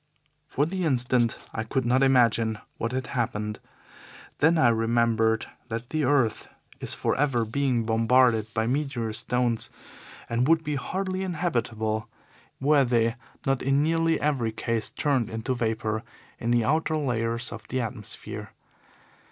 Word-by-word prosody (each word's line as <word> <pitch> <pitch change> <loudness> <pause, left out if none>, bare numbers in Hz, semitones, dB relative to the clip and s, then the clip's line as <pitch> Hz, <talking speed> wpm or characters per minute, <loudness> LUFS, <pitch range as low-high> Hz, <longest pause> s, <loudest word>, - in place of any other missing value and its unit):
For 145 - +1
the 185 +3 -3
instant 125 -5 +2 0.2
I 110 - -2
could 130 +2 -1
not 125 +2 +3
imagine 115 -4 +3 0.2
what 115 - -1
had 130 +1 -2
happened. 105 -4 -2 0.8
Then 160 +3 +4
I 125 -6 +5
remembered 115 -1 +2 0.2
that 115 +2 -5
the 155 -2 +1
earth 130 -5 +1 0.3
is - - -4
for - - 0
ever 130 -6 +2
being 125 0 0
bombarded 115 0 +3
by 110 0 +1
meteor 125 -4 -1
stones, 120 0 +1 0.6
and 120 +2 +1
would 160 0 +4
be 150 -1 -2
hardly 185 +7 -2
inhabitable 120 - -1 0.5
were 145 +1 +4
they 115 -2 +2 0.3
not 135 -1 +1
in 135 +2 +2
nearly 165 +1 +2
every 135 -7 0
case 115 0 -2
turned 120 -6 -1
to 130 - +1
vapour 110 -2 -1 0.4
in 120 - -2
the 120 -2 +3
outer 155 +4 +1
layers 120 -4 -1
of - - -9
the 130 - -2
atmosphere. 115 -3 -5
120 Hz, 145 wpm, -26 LUFS, 115-140 Hz, 0.8 s, I